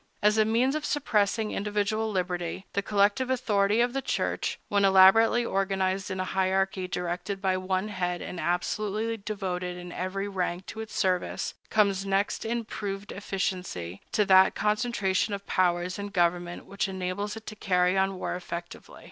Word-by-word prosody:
As 210 Hz, +1 st, +4 dB
a 215 Hz, -, +5 dB
means 235 Hz, +5 st, +2 dB
of 310 Hz, 0 st, -2 dB
suppressing 220 Hz, -7 st, +1 dB
individual 210 Hz, +2 st, -1 dB
liberty, 180 Hz, -1 st, -2 dB
the 200 Hz, -, +1 dB
collective 205 Hz, +5 st, +2 dB
authority 215 Hz, -4 st, +2 dB
of 240 Hz, 0 st, +1 dB
the 270 Hz, -, -1 dB
Church, -, -, -1 dB
when 200 Hz, -1 st, +2 dB
elaborately 195 Hz, +5 st, +6 dB
organized 195 Hz, -1 st, 0 dB
in 190 Hz, -1 st, -4 dB
a -, -, +1 dB
hierarchy 190 Hz, 0 st, 0 dB
directed 180 Hz, +2 st, -3 dB
by 190 Hz, -1 st, +1 dB
one 185 Hz, +2 st, -1 dB
head 180 Hz, -3 st, -2 dB
and 180 Hz, -, -6 dB
absolutely 210 Hz, +6 st, -1 dB
devoted 185 Hz, -4 st, -4 dB
in 175 Hz, 0 st, -8 dB
every 190 Hz, +3 st, -3 dB
rank 185 Hz, -2 st, -2 dB
to 220 Hz, -, -8 dB
its 220 Hz, -, -8 dB
service, 185 Hz, -3 st, 0 dB, 0.2 s
comes 200 Hz, -3 st, +2 dB
next 195 Hz, +2 st, 0 dB
in 230 Hz, 0 st, -1 dB
proved 200 Hz, -1 st, -5 dB
efficiency 180 Hz, -, -3 dB
to 210 Hz, -, +2 dB
that 190 Hz, 0 st, +6 dB
concentration 210 Hz, -2 st, 0 dB
of 200 Hz, -, -10 dB
powers 180 Hz, 0 st, +1 dB
in 200 Hz, -, -3 dB
government 175 Hz, -2 st, 0 dB
which 200 Hz, 0 st, -2 dB
enables 190 Hz, +2 st, -3 dB
it 225 Hz, 0 st, -10 dB
to 215 Hz, -, -7 dB
carry 180 Hz, -2 st, +2 dB
on 190 Hz, 0 st, +1 dB
war -, -, -3 dB
effectively. 175 Hz, -1 st, -7 dB
195 Hz, 165 wpm, -28 LUFS, 185-210 Hz, 0.2 s, elaborately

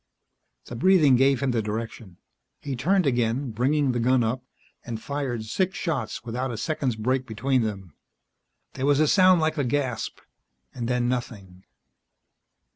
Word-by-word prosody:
The 120 Hz, -, -8 dB
breathing 155 Hz, -1 st, +5 dB
gave 135 Hz, 0 st, +3 dB
him 135 Hz, -, +1 dB
the 115 Hz, -2 st, 0 dB
direction. 105 Hz, -3 st, -6 dB, 0.5 s
He 140 Hz, -2 st, -3 dB
turned 185 Hz, +8 st, +2 dB
again, 120 Hz, 0 st, 0 dB
bringing 135 Hz, +5 st, +1 dB
the 120 Hz, -, -1 dB
gun 125 Hz, +1 st, +3 dB
up, 120 Hz, +3 st, -2 dB, 0.4 s
and 115 Hz, -2 st, -5 dB
fired 130 Hz, -4 st, -3 dB
six 185 Hz, -, -1 dB
shots 140 Hz, -, -3 dB
without 125 Hz, +3 st, -3 dB
a 115 Hz, -, -5 dB
second's 130 Hz, -1 st, -1 dB
break 130 Hz, +4 st, -1 dB
between 125 Hz, +3 st, 0 dB
them. 100 Hz, -7 st, -4 dB, 0.8 s
There 135 Hz, -, -2 dB
was 145 Hz, 0 st, +3 dB
a 155 Hz, -, +4 dB
sound 185 Hz, 0 st, +5 dB
like 155 Hz, 0 st, 0 dB
a -, -, +2 dB
gasp, 130 Hz, -2 st, -2 dB, 0.6 s
and 120 Hz, -2 st, -4 dB
then 125 Hz, 0 st, 0 dB
nothing. 100 Hz, -7 st, -5 dB
125 Hz, 155 wpm, -25 LUFS, 115-140 Hz, 0.8 s, breathing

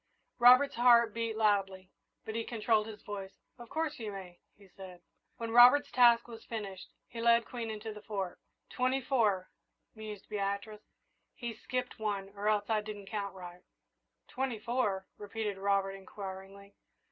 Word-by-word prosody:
Robert's 255 Hz, +4 st, +7 dB
heart 235 Hz, -2 st, +6 dB
beat 230 Hz, -1 st, -2 dB
loudly, 195 Hz, -3 st, +1 dB, 0.3 s
but 220 Hz, -, -5 dB
he 230 Hz, 0 st, -2 dB
controlled 220 Hz, -2 st, +1 dB
his 215 Hz, -1 st, -10 dB
voice. 195 Hz, -2 st, -7 dB, 0.2 s
"Of 240 Hz, -1 st, -11 dB
course 315 Hz, -3 st, -2 dB
you 220 Hz, -2 st, -4 dB
may," 185 Hz, -3 st, -9 dB, 0.2 s
he 200 Hz, -1 st, -18 dB
said. 185 Hz, -2 st, -12 dB, 0.3 s
When 230 Hz, -2 st, -4 dB
Ronald's 250 Hz, +5 st, +7 dB
task 235 Hz, -2 st, +5 dB
was 225 Hz, -2 st, -10 dB
finished, 200 Hz, -5 st, -6 dB, 0.2 s
he 230 Hz, -, -7 dB
led 235 Hz, 0 st, +4 dB
Queen 235 Hz, -2 st, -5 dB
into 215 Hz, 0 st, -5 dB
the 210 Hz, -, -11 dB
Fort. 195 Hz, -4 st, -4 dB, 0.3 s
"Twenty 255 Hz, +1 st, +1 dB
four," 220 Hz, -8 st, +1 dB, 0.4 s
mused 215 Hz, -2 st, -9 dB
Beatrice. 200 Hz, +1 st, -3 dB, 0.5 s
"He's 235 Hz, -3 st, -6 dB
skipped 250 Hz, -1 st, -4 dB
one, 200 Hz, -2 st, -2 dB
or 205 Hz, +1 st, -5 dB
else 205 Hz, -1 st, +1 dB
I 220 Hz, -2 st, +1 dB
didn't 210 Hz, -1 st, -8 dB
count 200 Hz, -3 st, -3 dB
right." 180 Hz, -1 st, -10 dB, 0.7 s
"Twenty 260 Hz, -3 st, -3 dB
four?" 210 Hz, -4 st, -1 dB
repeated 210 Hz, -1 st, -4 dB
Robert, 195 Hz, 0 st, +1 dB
inquiringly. 195 Hz, 0 st, -9 dB
215 Hz, 155 wpm, -32 LUFS, 195-235 Hz, 0.7 s, Robert's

